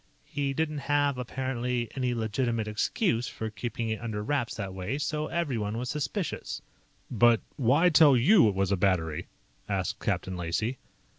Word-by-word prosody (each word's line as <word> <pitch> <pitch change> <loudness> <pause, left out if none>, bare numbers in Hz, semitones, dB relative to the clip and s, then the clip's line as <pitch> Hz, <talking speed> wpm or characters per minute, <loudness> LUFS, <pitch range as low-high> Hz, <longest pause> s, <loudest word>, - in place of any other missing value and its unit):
He 140 -1 -2
didn't 155 -1 -1
have, 145 -2 +2
apparently, 125 -1 -2
any 125 -2 0
legitimate 115 0 -1
excuse 115 - 0
for 110 -1 -5
keeping 115 +1 -4
it 110 +1 -2
under 110 -3 -3
wraps 130 0 -1
that 100 -4 -5
way, 95 +8 -3
so 150 +1 -2
everyone 115 -11 -2
was 125 +2 -3
suspicious." 150 +6 -3 0.5
"But 120 0 +5 0.2
why 145 +8 +4
tell 150 -5 +7
you 155 - +6
it 100 - -3
was 95 0 +1
a 100 - +2
battery?" 85 -4 0 0.4
asked - - -1
Captain 95 - -2
Lacey. 90 +9 -2
120 Hz, 155 wpm, -28 LUFS, 105-140 Hz, 0.5 s, tell